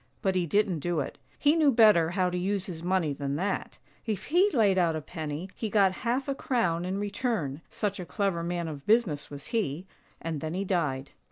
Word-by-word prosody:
But 190 Hz, -, +2 dB
he 180 Hz, -2 st, 0 dB
didn't 200 Hz, -2 st, +2 dB
do 175 Hz, +1 st, -1 dB
it 140 Hz, -, -4 dB
— -, -, -33 dB
he 295 Hz, +1 st, +4 dB
knew 310 Hz, -4 st, +5 dB
better 215 Hz, -9 st, +6 dB
how 180 Hz, 0 st, +1 dB
to 180 Hz, -, -2 dB
use 195 Hz, +1 st, -1 dB
his 165 Hz, -4 st, -6 dB
money 175 Hz, -4 st, +1 dB
than 140 Hz, 0 st, -3 dB
that: 190 Hz, +5 st, -2 dB, 0.3 s
if 215 Hz, -4 st, -2 dB
he 360 Hz, +6 st, +4 dB
laid 205 Hz, -, +3 dB
out 170 Hz, -2 st, +2 dB
a 155 Hz, -, -3 dB
penny, 155 Hz, +1 st, -5 dB
he 220 Hz, -, -4 dB
got 200 Hz, -3 st, +4 dB
half 255 Hz, +3 st, 0 dB
a 275 Hz, -, 0 dB
crown 185 Hz, -, 0 dB
in 185 Hz, +2 st, -2 dB
return, 205 Hz, -, -2 dB
such 205 Hz, -2 st, -2 dB
a 180 Hz, -, -5 dB
clever 195 Hz, -5 st, 0 dB
man 170 Hz, 0 st, -2 dB
of 145 Hz, -3 st, -7 dB
business 210 Hz, -10 st, +2 dB
was 145 Hz, 0 st, -9 dB
he 185 Hz, -, -1 dB, 0.2 s
— -, -, -35 dB
and 160 Hz, -3 st, -4 dB
then 160 Hz, +1 st, -3 dB
he 195 Hz, +2 st, -1 dB
died. 145 Hz, -8 st, -1 dB
185 Hz, 225 wpm, -28 LUFS, 160-210 Hz, 0.3 s, better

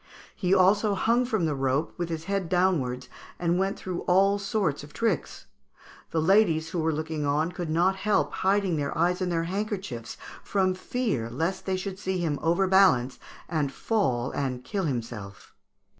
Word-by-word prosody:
He 180 Hz, -2 st, -1 dB
also 200 Hz, +2 st, +4 dB
hung 235 Hz, +6 st, +2 dB
from 220 Hz, -8 st, 0 dB
the 155 Hz, -, 0 dB
rope 135 Hz, +2 st, 0 dB
with 175 Hz, -1 st, -3 dB
his 160 Hz, -1 st, -4 dB
head 195 Hz, -1 st, -2 dB
downwards, 150 Hz, -9 st, +1 dB, 0.3 s
and 175 Hz, +1 st, +1 dB
went 195 Hz, +1 st, 0 dB
through 185 Hz, -2 st, -4 dB
all 195 Hz, +3 st, +4 dB
sorts 195 Hz, -8 st, -1 dB
of 150 Hz, -, -12 dB
tricks. 220 Hz, -9 st, -2 dB, 0.6 s
The 165 Hz, -, 0 dB
ladies 165 Hz, -2 st, +3 dB
who 175 Hz, -, -2 dB
were 160 Hz, 0 st, +1 dB
looking 155 Hz, 0 st, -3 dB
on 150 Hz, +4 st, +1 dB
could 175 Hz, -3 st, -5 dB
not 175 Hz, +4 st, +2 dB
help 210 Hz, +2 st, +1 dB
hiding 190 Hz, -3 st, +1 dB
their 145 Hz, -1 st, -2 dB
eyes 180 Hz, +3 st, +1 dB
in 185 Hz, -, 0 dB
their 165 Hz, -1 st, 0 dB
handkerchiefs, 185 Hz, -, -4 dB, 0.3 s
from 190 Hz, -2 st, +1 dB
fear 185 Hz, -, -2 dB
lest 165 Hz, +12 st, -2 dB
they 190 Hz, -1 st, +1 dB
should 190 Hz, 0 st, -5 dB
see 190 Hz, -2 st, -2 dB
him 160 Hz, -5 st, -1 dB
overbalance 175 Hz, -7 st, +3 dB, 0.3 s
and 155 Hz, -5 st, -1 dB
fall 130 Hz, -, 0 dB
and 130 Hz, -3 st, -3 dB
kill 190 Hz, +8 st, -2 dB
himself." 115 Hz, -, -5 dB
175 Hz, 170 wpm, -27 LUFS, 150-195 Hz, 0.6 s, also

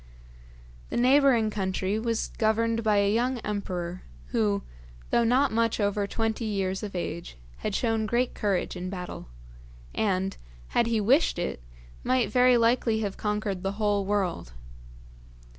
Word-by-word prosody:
The -, -, -3 dB
neighbouring 250 Hz, -3 st, +4 dB
country 190 Hz, 0 st, -1 dB
was 230 Hz, 0 st, -1 dB
governed 230 Hz, +1 st, +2 dB
by 215 Hz, -1 st, +3 dB
a 200 Hz, 0 st, +3 dB
young 245 Hz, +3 st, +1 dB
emperor, 185 Hz, -4 st, -4 dB, 0.3 s
who, 210 Hz, -4 st, +1 dB, 0.5 s
though 235 Hz, -, +4 dB
not 255 Hz, +5 st, +3 dB
much 230 Hz, 0 st, +1 dB
over 205 Hz, 0 st, 0 dB
twenty 225 Hz, +1 st, -2 dB
years 195 Hz, -3 st, -1 dB
of 205 Hz, -3 st, -6 dB
age, 170 Hz, -, -5 dB, 0.2 s
had 210 Hz, -, -3 dB
shown 225 Hz, -2 st, 0 dB
great 240 Hz, +3 st, +1 dB
courage 200 Hz, -4 st, -1 dB
in 180 Hz, 0 st, -4 dB
battle, 180 Hz, -, -6 dB, 0.7 s
and, 195 Hz, -2 st, 0 dB, 0.3 s
had 235 Hz, -, +2 dB
he 230 Hz, -1 st, +1 dB
wished 255 Hz, -, +3 dB
it, 175 Hz, -, -3 dB, 0.4 s
might 250 Hz, -4 st, +1 dB
very 250 Hz, +1 st, +5 dB
likely 230 Hz, -1 st, +2 dB
have 200 Hz, -2 st, -2 dB
conquered 210 Hz, -3 st, -2 dB
the 195 Hz, +1 st, -2 dB
whole 205 Hz, -1 st, +1 dB
world. 190 Hz, -, -1 dB
215 Hz, 140 wpm, -27 LUFS, 195-230 Hz, 0.7 s, very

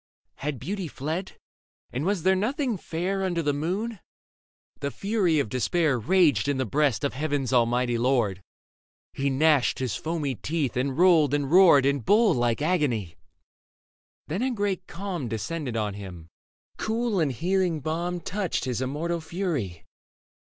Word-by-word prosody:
Had 145 Hz, -1 st, -3 dB
beauty 195 Hz, -, -4 dB
fled, 160 Hz, +7 st, -4 dB, 0.6 s
and 130 Hz, +5 st, -3 dB
was 195 Hz, -5 st, 0 dB
there 190 Hz, +1 st, +4 dB
nothing 245 Hz, -, 0 dB
fair 185 Hz, +2 st, -3 dB
Under 175 Hz, -3 st, -1 dB
the 145 Hz, -1 st, +1 dB
moon? 190 Hz, +9 st, -2 dB, 0.8 s
The 140 Hz, -, -2 dB
fury 195 Hz, -, 0 dB
of 140 Hz, -, +1 dB
despair 135 Hz, -, +1 dB
Raged 150 Hz, -, +3 dB
in 145 Hz, -1 st, +1 dB
the 130 Hz, -, 0 dB
breast 140 Hz, -1 st, +1 dB
of 140 Hz, -, 0 dB
heaven's 140 Hz, -2 st, -1 dB
Almighty 120 Hz, 0 st, +2 dB
Lord; 115 Hz, -7 st, +1 dB, 0.7 s
He 140 Hz, +1 st, 0 dB
gnashed 145 Hz, 0 st, +3 dB
his 130 Hz, -4 st, -2 dB
foamy 155 Hz, -4 st, -2 dB
teeth 145 Hz, 0 st, -2 dB
and 130 Hz, +2 st, -1 dB
rolled 165 Hz, -5 st, +5 dB
and 145 Hz, -1 st, -2 dB
roared 170 Hz, -7 st, +7 dB
In 140 Hz, 0 st, +2 dB
bull 210 Hz, -, +4 dB
like 120 Hz, +2 st, 0 dB
agony. 140 Hz, -, 0 dB, 1.1 s
Then 175 Hz, +8 st, -2 dB
a 260 Hz, -, +1 dB
great 205 Hz, -6 st, -2 dB
calm 180 Hz, -7 st, -4 dB
Descended 115 Hz, +4 st, -3 dB
on 105 Hz, -2 st, -1 dB
him: 90 Hz, -5 st, -9 dB, 0.5 s
cool 225 Hz, -2 st, -1 dB
and 155 Hz, -4 st, +1 dB
healing 175 Hz, -, 0 dB
balm 170 Hz, +4 st, -3 dB
Touched 190 Hz, -2 st, -2 dB
his 125 Hz, -1 st, -2 dB
immortal 160 Hz, +6 st, -2 dB
fury. 160 Hz, -, -3 dB
150 Hz, 150 wpm, -26 LUFS, 130-185 Hz, 1.1 s, roared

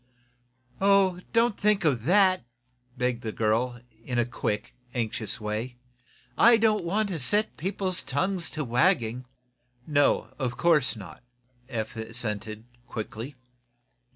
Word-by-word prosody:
"Oh, 195 Hz, -2 st, +4 dB
don't 230 Hz, -2 st, +2 dB
think 210 Hz, -3 st, +2 dB
of 125 Hz, -7 st, +1 dB
that," 185 Hz, -1 st, +4 dB, 0.5 s
begged 125 Hz, -1 st, 0 dB
the 110 Hz, -3 st, -3 dB
girl, 115 Hz, +3 st, 0 dB, 0.2 s
in 125 Hz, +1 st, -3 dB
a 120 Hz, -, +3 dB
quick, 105 Hz, -2 st, -3 dB, 0.2 s
anxious 110 Hz, -2 st, -3 dB
way. 110 Hz, +4 st, -4 dB, 0.6 s
"I 235 Hz, 0 st, +7 dB
don't 215 Hz, -2 st, +2 dB
want 205 Hz, +5 st, 0 dB
to 175 Hz, -4 st, -2 dB
set 205 Hz, +12 st, +1 dB
people's 185 Hz, +1 st, -1 dB
tongues 175 Hz, +5 st, -1 dB
to 155 Hz, -, 0 dB
wagging." 125 Hz, -, +1 dB, 0.6 s
"No; 145 Hz, -2 st, +2 dB
of 125 Hz, -3 st, -2 dB
course 150 Hz, -8 st, +3 dB
not," 95 Hz, -8 st, -10 dB, 0.5 s
Eph 110 Hz, -4 st, -4 dB
assented, 110 Hz, -1 st, -3 dB, 0.2 s
quickly. 115 Hz, +3 st, -6 dB
130 Hz, 125 wpm, -27 LUFS, 115-185 Hz, 0.6 s, I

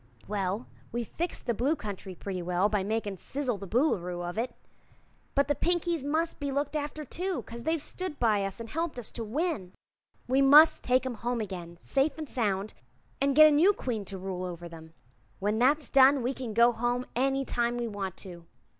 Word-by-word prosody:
"Well, 200 Hz, +2 st, -2 dB, 0.3 s
we've 235 Hz, -1 st, -3 dB
fixed 345 Hz, +1 st, -4 dB
the 235 Hz, -, +1 dB
Blue 265 Hz, +8 st, +1 dB
Country 200 Hz, -, -7 dB
pretty 185 Hz, +1 st, -5 dB
well, 180 Hz, +3 st, +1 dB
by 210 Hz, -3 st, 0 dB
makin' 205 Hz, -1 st, -2 dB
'Sizzle 255 Hz, +1 st, -2 dB
the 195 Hz, -, -7 dB
Boolooroo 180 Hz, -, 0 dB
of 175 Hz, -, -5 dB
it; 235 Hz, +2 st, -2 dB, 0.8 s
but 280 Hz, 0 st, +3 dB
the 290 Hz, -, +3 dB
Pinkies 345 Hz, -1 st, 0 dB
mus' 315 Hz, +4 st, 0 dB
be 285 Hz, -1 st, -4 dB
looked 285 Hz, +2 st, -1 dB
after, 300 Hz, +1 st, -3 dB
too, 365 Hz, +6 st, -3 dB
'cause 235 Hz, 0 st, -9 dB
they've 325 Hz, 0 st, +1 dB
stood 365 Hz, +1 st, -4 dB
by 215 Hz, -4 st, +3 dB
us 195 Hz, +3 st, -4 dB
an' 230 Hz, -, -5 dB
helped 325 Hz, +4 st, -3 dB
us 245 Hz, -, 0 dB
to 230 Hz, -, -4 dB
win. 225 Hz, -, -2 dB, 0.5 s
We 260 Hz, +2 st, +3 dB
must 295 Hz, +4 st, +7 dB
take 255 Hz, +1 st, +2 dB
'em 260 Hz, -, -2 dB
home 240 Hz, +2 st, -2 dB
again, 180 Hz, -5 st, -6 dB
safe 275 Hz, +2 st, +1 dB
an' 315 Hz, -, -4 dB
sound, 210 Hz, -7 st, -1 dB, 0.5 s
and 275 Hz, -1 st, +2 dB
get 310 Hz, +1 st, +10 dB
a 305 Hz, -, +7 dB
new 335 Hz, +8 st, +5 dB
Queen 235 Hz, -, -3 dB
to 195 Hz, 0 st, -6 dB
rule 185 Hz, -1 st, -4 dB
over 175 Hz, -1 st, -6 dB
'em. 160 Hz, 0 st, -13 dB, 0.4 s
When 210 Hz, +2 st, 0 dB
that's 285 Hz, +4 st, +2 dB
done 270 Hz, 0 st, +6 dB
we 250 Hz, +3 st, 0 dB
can 245 Hz, -5 st, -6 dB
go 235 Hz, +1 st, +6 dB
home 240 Hz, +2 st, -1 dB
any 270 Hz, +2 st, +1 dB
time 240 Hz, -1 st, 0 dB
we 240 Hz, -1 st, -2 dB
want 195 Hz, -3 st, -5 dB
to." 170 Hz, -2 st, -10 dB
240 Hz, 200 wpm, -29 LUFS, 200-285 Hz, 0.8 s, get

